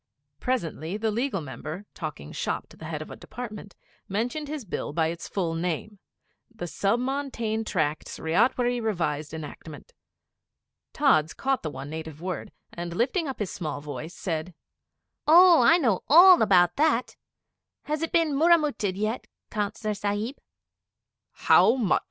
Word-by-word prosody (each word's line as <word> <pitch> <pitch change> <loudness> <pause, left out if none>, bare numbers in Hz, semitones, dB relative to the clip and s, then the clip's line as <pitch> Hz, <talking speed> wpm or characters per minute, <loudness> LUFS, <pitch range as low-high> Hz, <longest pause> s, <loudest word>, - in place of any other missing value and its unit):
Presently, 175 - -2
the 220 0 0
Legal 230 -3 -1
Member, 155 +6 -7
talking 150 - -7
'shop' - - -3
to - - -15
the 160 - -11
Head 155 -1 -4
of - - -13
a - - -7
Department, 215 -5 -8 0.3
mentioned 240 +9 -2
his 295 -4 -5
Bill 160 -5 -4
by 160 0 +1
its 170 0 -6
full 175 -5 -2
name 180 +5 -3 0.5
'The 225 -6 -7
Sub 200 +6 0
Montane 250 -4 -2
Tracts 155 -7 -2
Ryotwary 240 +8 +1
Revised 160 -9 -2
Enactment.' 160 - -9 1.0
Tods 165 - +3
caught 270 -1 0
the 155 - -3
one 140 0 -8
native 160 -1 -7
word, 185 +1 -5 0.2
and 170 0 -5
lifting 275 - 0
up 270 - -4
his 205 -4 -3
small 155 -6 -4
voice 150 +4 -7
said 165 -1 -4 0.7
'Oh, 345 +2 +8
I 335 - +6
know 230 - +1
all 355 +4 +8
about 180 -4 +4
that! 290 -5 +2 0.7
Has 305 +1 -2
it 330 - -2
been 325 -3 +2
murramutted 295 - +2
yet, 215 +4 -2 0.2
Councillor 210 0 -2
Sahib?' 205 +5 -3 0.9
'How 230 - +5
much?' 230 -8 +2
205 Hz, 145 wpm, -26 LUFS, 165-255 Hz, 1.0 s, Oh